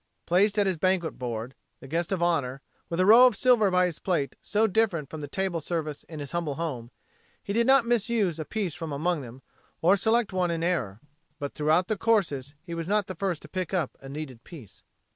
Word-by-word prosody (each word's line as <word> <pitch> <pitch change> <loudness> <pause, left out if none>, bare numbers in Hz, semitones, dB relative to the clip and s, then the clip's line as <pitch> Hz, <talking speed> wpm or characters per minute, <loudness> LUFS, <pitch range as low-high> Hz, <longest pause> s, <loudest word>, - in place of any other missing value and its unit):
Placed 200 +4 +3
at 205 - +3
his 190 -3 0
first - - -23
banquet 185 -1 0
board 120 0 -4 0.3
the - - -11
guest 165 +5 -2
of 185 -3 0
honor 140 -6 0 0.3
with 170 - -3
a 185 - +4
row 235 +5 +9
of 245 - 0
silver 235 -2 +4
by 180 0 +3
his 175 -4 -3
plate 165 -7 -1
so 215 +1 +1
different 195 -8 0
from 160 - -6
the 145 - -5
table 185 +1 -2
service 155 -2 -3
in 160 -2 -9
his 145 -1 -6
humble 170 -5 -2
home, 140 -8 -4 0.5
he 200 - -3
did 230 +2 +2
not 265 -2 +5
misuse 220 -7 +1
a - - -2
piece 200 -4 -3
from 165 -2 -6
among 160 +3 0
them 125 +1 -11 0.4
or 180 +4 +5
select 220 +1 +1
one 180 -1 +1
in 165 -1 -2
error. 125 - -1 0.4
But 145 -1 -5
throughout 155 +4 +2
the 215 - -1
courses 155 - +1
he 170 -1 -7
was 165 0 -4
not 210 0 +2
the 185 - -6
first 185 -3 -3
to - - -10
pick 185 +3 -3
up 170 -7 -1
a 135 - -10
needed 135 -5 -7
piece. 135 - -13
170 Hz, 225 wpm, -27 LUFS, 150-195 Hz, 0.5 s, row